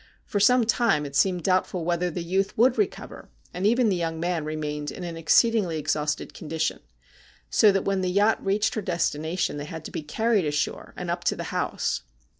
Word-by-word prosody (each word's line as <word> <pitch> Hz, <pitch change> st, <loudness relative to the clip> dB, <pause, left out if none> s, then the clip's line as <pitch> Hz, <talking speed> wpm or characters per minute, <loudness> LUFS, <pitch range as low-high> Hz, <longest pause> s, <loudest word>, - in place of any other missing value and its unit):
For 205 Hz, -, -2 dB
some 250 Hz, +3 st, +5 dB
time 225 Hz, -10 st, +2 dB
it 140 Hz, -1 st, -7 dB
seemed 180 Hz, +3 st, +2 dB
doubtful 185 Hz, -2 st, 0 dB
whether 175 Hz, +1 st, 0 dB
the 175 Hz, +1 st, -4 dB
youth 190 Hz, +3 st, -1 dB
would 245 Hz, +3 st, +4 dB
recover, 415 Hz, -1 st, -3 dB, 0.2 s
and 185 Hz, +3 st, 0 dB
even 240 Hz, +2 st, +3 dB
the 200 Hz, -, +2 dB
young 165 Hz, -2 st, -2 dB
man 170 Hz, -2 st, -1 dB
remained 150 Hz, -1 st, -3 dB
in 185 Hz, -, -7 dB
an 170 Hz, -1 st, -5 dB
exceedingly 180 Hz, +1 st, +3 dB
exhausted 150 Hz, 0 st, -2 dB
condition, 160 Hz, 0 st, -3 dB, 0.7 s
so 215 Hz, -, +6 dB
that 195 Hz, -1 st, 0 dB
when 195 Hz, -1 st, 0 dB
the 185 Hz, -, 0 dB
yacht 205 Hz, +4 st, +2 dB
reached 205 Hz, +2 st, +1 dB
her 215 Hz, -, -2 dB
destination 170 Hz, -2 st, -1 dB
they 145 Hz, -, -5 dB
had 160 Hz, 0 st, -8 dB
to -, -, -7 dB
be -, -, -4 dB
carried 210 Hz, +5 st, +1 dB
ashore 150 Hz, 0 st, -2 dB
and 180 Hz, -1 st, -3 dB
up 175 Hz, 0 st, -3 dB
to -, -, +2 dB
the -, -, -5 dB
house. -, -, -1 dB
180 Hz, 200 wpm, -25 LUFS, 155-200 Hz, 0.7 s, so